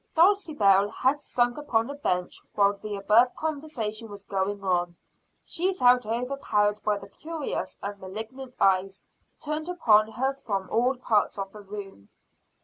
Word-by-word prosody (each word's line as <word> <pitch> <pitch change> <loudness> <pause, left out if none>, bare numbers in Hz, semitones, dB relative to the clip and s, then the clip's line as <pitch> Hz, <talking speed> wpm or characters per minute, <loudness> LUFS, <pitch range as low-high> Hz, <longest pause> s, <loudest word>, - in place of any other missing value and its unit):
Dulcibel 305 - +4
had 265 +6 0
sunk 240 0 0
upon 230 -6 0
a 280 - -5
bench 180 -11 -2
while 200 0 +4
the 205 +1 -6
above 220 +5 +4
conversation 280 -9 -4
was 200 -1 -8
going 195 +1 -2
on 175 -2 0 0.5
she 370 +3 0
felt 250 - +4
overpowered 225 -4 0
by 210 -1 +1
the 200 0 -10
curious 315 +7 -5
and 200 0 -5
malignant 225 +7 -8
eyes 190 0 +2 0.4
turned 305 +2 -4
upon 220 -12 +4
her 265 +3 0
from 200 -8 -3
all 250 +3 +2
parts 220 -5 +1
of 195 -1 -4
the 210 - -11
room. 195 - -9
215 Hz, 145 wpm, -27 LUFS, 200-270 Hz, 0.5 s, Dulcibel